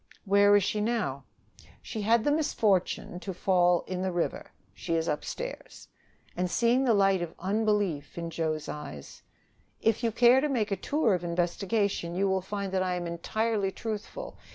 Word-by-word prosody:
"Where 200 +1 +5
is 205 - +4
she 210 +3 -1
now?" 210 - -1 0.6
"She 220 - -5
had 225 +2 +3
the 290 - +2
misfortune 205 - 0
to 190 0 -6
fall 180 -1 +3
in 185 -1 -4
the 190 0 -1
river. 175 -1 -2 0.2
She 165 - -3
is 165 0 0
upstairs." - - -5 0.5
And, 180 0 -1
seeing 240 +6 +2
the 235 -4 +4
light 195 -2 +3
of 170 -1 -5
unbelief 200 -6 -1
in 170 -1 -4
Joe's 155 -2 -2
eyes: 110 - -8 0.6
"If 225 +1 +1
you 230 - +2
care 240 +3 +5
to 300 - 0
make 225 -6 0
a - - +2
tour 235 +3 +1
of 180 -1 -1
investigation, 175 +1 -1
you 195 +2 +1
will 190 0 +1
find 200 0 -4
that 190 -1 +1
I 185 -1 0
am 175 -1 -3
entirely 200 +4 -1
truthful. 225 - -6
195 Hz, 175 wpm, -28 LUFS, 175-220 Hz, 0.6 s, Where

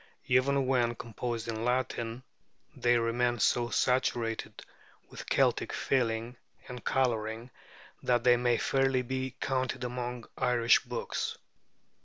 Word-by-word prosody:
Even 135 +2 +3
when 120 -2 +1
composed 115 0 -4
in 115 -1 -3
Latin, 125 -1 -1 0.5
they 120 0 +3
remain 120 +1 +1
so 120 +2 +2
saturated 120 -3 0 0.5
with - - -9
Celtic - - +2
feeling 120 -2 -1 0.3
and 125 -1 -8
coloring 115 -2 -1 0.5
that 120 -1 +1
they 125 -1 +6
may 120 -1 +2
fairly 135 0 +1
be 130 +1 -3
counted 130 -1 -1
among 125 -1 -4
Irish 120 -1 +4
books. 120 -2 -4
120 Hz, 115 wpm, -30 LUFS, 115-130 Hz, 0.5 s, they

